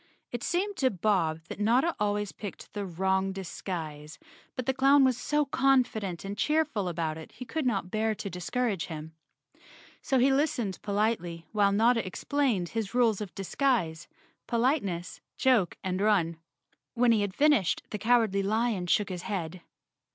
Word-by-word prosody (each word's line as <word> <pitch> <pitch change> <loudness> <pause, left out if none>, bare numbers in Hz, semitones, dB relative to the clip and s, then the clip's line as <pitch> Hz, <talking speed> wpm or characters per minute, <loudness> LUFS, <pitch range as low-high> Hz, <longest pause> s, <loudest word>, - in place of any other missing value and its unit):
It 240 - -4
seemed 380 +6 -1
to 260 - +3
Bob 180 -6 0
that - - -7
Notta 245 +10 +2
always 205 -1 0
picked 205 -3 -9
the 205 -2 -4
wrong 190 +2 0
disguise, 160 -5 -6 0.4
but 255 - -3
the 265 - +1
clown 275 +2 +5
was 260 -2 +4
so 295 +5 0
confident 250 -10 +1
and 200 +1 -4
cheerful 295 -5 0
about 160 -2 -2
it 160 - -12
he 250 - -8
could 280 +3 -2
not 195 -6 -1
bear 220 0 0
to 205 - -6
discourage 200 +2 -2
him. 160 -1 -7 0.9
So 265 - +1
he 265 +2 +4
listened 270 -9 0
politely 200 -5 -1
while 205 -2 +3
Notta 230 +3 +3
explained 205 - -1
his 225 -1 -4
rules 230 -5 +3
of 200 -4 -7
disguise, 195 - 0 0.4
politeness, 230 - 0 0.2
joke 240 -10 +2
and 185 0 -2
run. 185 -6 +2 0.6
When 240 0 +4
he 220 -2 +3
had 200 -2 -2
fin¬ 300 +1 +6
ished 170 -5 -1
the 210 - -3
Cowardly 220 -3 +3
Lion 215 -2 0
shook 205 +4 +2
his 180 -2 -4
head. 180 -3 -4
210 Hz, 160 wpm, -29 LUFS, 185-250 Hz, 0.9 s, fin¬